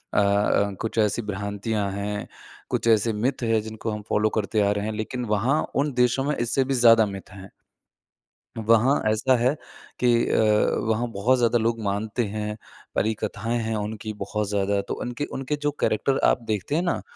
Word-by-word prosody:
अ - - +5
अ, 100 0 +2
कुछ 115 0 -4
ऐसी 105 +2 +2
भ्रांतियाँ 100 0 -3
हैं 100 +1 -4 0.4
कुछ - - -1
ऐसे 115 0 +4
मिथ 120 +5 -1
है 115 -1 +2
जिनको 110 +1 -5
हम 105 0 -4
फॉलो 105 +1 +2
करते 110 0 0
आ 100 0 +3
रहे 105 0 -1
हैं। 110 - -2
लेकिन 115 +3 -4
वहाँ 120 +8 +1
उन 145 +2 +1
देशों 125 +2 +2
में 150 +1 0
इससे 120 +3 +1
भी 135 +1 -2
ज़्यादा 115 -3 +6
मिथ 100 -2 -7
हैं। 95 -1 -11 1.1
वहाँ 115 +5 +3
ऐसा 120 +4 +2
है 125 +5 +2 0.4
कि 125 - +2 0.2
अ, 105 -1 +3
वहाँ 115 +2 +1
बहुत 115 +6 +2
ज़्यादा 120 0 +3
लोग 115 0 0
मानते 105 +4 -1
हैं, 105 +1 -4 0.4
परी 110 +2 +1
कथाएँ 115 +3 -2
हैं 110 0 -2
उनकी 110 +1 -4
बहुत 105 0 -3
ज़्यादा। 100 0 +1
तो - - -2
उनके 125 +4 -3
उनके 135 +2 -2
जो 145 0 +1
कैरेक्टर 135 +5 +1
आप - - +2
देखते 110 +6 -1
हैं 170 - +2
ना? 175 - -1
110 Hz, 185 wpm, -24 LUFS, 105-120 Hz, 1.1 s, ज़्यादा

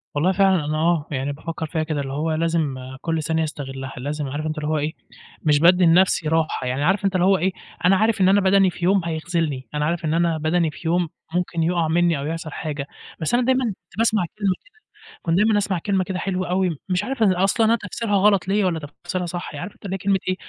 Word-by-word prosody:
والله 160 +6 +2
فعلًا، 190 -4 +3
أنا 155 +1 -1
آه، 165 -1 +1
يعني 140 0 -2
بافكر 160 +3 -5
فيها 160 0 -2
كده، 155 -2 -2
اللي 135 -1 -5
هو 155 +3 -1
لازم 160 -3 0 0.3
كلّ 165 -2 -1
ثانية 160 +1 0
أستغلها، 135 -3 -6
لازم 145 +3 -3
عارف 145 +3 -4
أنت 155 0 -3
اللي 150 0 -3
هو 155 - +1
إيه، 150 +2 -2 0.5
مش 150 -2 +4
بادّي 180 +3 +5
لنفسي 170 -1 +4
راحة 160 -4 0
يعني. 130 +3 -1
عارف 195 +5 +2
أنت 195 -1 +1
اللي 180 -1 +3
هو 195 0 +5
إيه، 185 +3 +1 0.3
أنا 190 +2 +6
عارف 220 +1 +2
إن 185 - +5
أنا 200 +1 +4
بَدَني 190 0 +4
في 175 0 -4
يوم 195 +1 +4
هيخذلني، 160 -4 -2
أنا 150 0 0
عارف 170 +1 -1
إن 155 - 0
أنا 170 -1 +2
بَدَني 160 +1 +1
في 160 - -8
يوم 175 0 +1 0.2
ممكن 175 -2 0
يُقع 170 -1 +1
مني، 170 0 +2
أو 140 - -4
يحصل 165 0 -4
حاجة. 145 -2 -4 0.3
بس 160 - -1
أنا 245 +1 +3
دايمًا 260 0 +2
كنت 200 -3 -7
باسمع 220 -4 +2
كلمة 200 -3 +2
كده، - - -24 0.5
كنت 165 -1 0
دايمًا 210 +1 +4
أسمّع 195 -3 0
كلمة 190 +1 0
كده 185 0 -4
حلوة 185 -1 -2
أوي، 180 -3 0
مش 185 +1 +1
عارف 255 +1 -1
أصلًا 195 +3 +3
أنا 225 +1 +4
تفسيرها 225 -3 -2
غلط 195 -2 +3
ليّا، 200 +1 +2
والّا 170 -3 0 0.2
تفسيرها 180 +1 -2
صح. 175 -2 -5
عارف 175 +7 -6
أنت - - -18
اللي 190 - -3
هي - - -1
كلمة 195 +1 +1
إيه، 185 - +1
170 Hz, 235 wpm, -22 LUFS, 155-190 Hz, 0.5 s, أنا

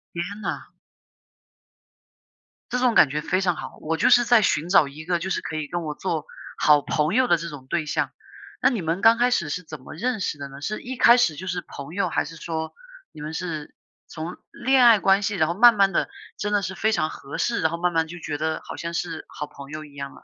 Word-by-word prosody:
天 170 - -1 0.2
呐！ - - -4 2.0
这 250 - 0
种 250 -2 +2
感 140 - +7
觉 150 +2 -2
非 185 +4 0
常 180 -3 +1
好， - - -8
我 160 +1 -2
就 - - +3
是 240 0 +6
在 235 -2 +5
寻 170 -3 +1
找 160 -6 +5
一 155 +3 -10
个 175 -1 0
就 190 +3 -4
是 - - -1
可 155 - -6
以 155 -2 -3
跟 175 +1 -3
我 150 -1 -3
做 160 -3 -3 0.3
好 150 -1 +5
朋 155 +4 0
友 255 +2 +3
的 175 - +4
这 170 +1 -6
种 135 -3 -10
对 165 -3 -1
象。 - - -1 0.5
那 - - +5
你 230 -8 -2
们 165 +3 -2
刚 225 +1 +6
开 245 +1 +3
始 170 -10 0
是 180 +5 -3
怎 155 -3 -9
么 - - -11
认 240 +6 -2
识 150 - -2
的 140 -1 -6
呢？ 140 +1 -11
是 215 +7 -3
一 255 0 -6
开 240 -1 +7
始 170 -11 +2
就 185 +5 -7
是 180 0 -2
朋 140 +3 -10
友， 190 -3 0
还 - - 0
是 165 - -9
说 160 0 -4 0.4
你 150 - -12
们 155 +1 -5
是 160 -4 -5 0.3
从 165 +2 -7
恋 265 0 +3
爱 225 -3 +7
关 195 +1 +4
系， 205 0 -1
然 155 -4 +2
后 170 - -1
慢 235 +4 +7
慢 195 -1 +4
地 - - 0 0.3
真 210 - -2
的 205 - +3
是 190 0 -4
非 220 +3 +1
常 155 -5 0
合 140 - -8
适 235 - 0
然 160 - +3
后 170 - -3
慢 175 0 0
慢 160 0 +1
就 175 +2 -9
觉 145 -2 -4
得 160 +1 -2
好 - - -8
像 170 0 -5
是 165 -2 -4
好 150 - -6
朋 140 -1 -12
友 155 0 -7
一 145 - -16
样 140 -1 -7
了。 - - -17
170 Hz, 275 characters per minute, -24 LUFS, 155-200 Hz, 2.0 s, 感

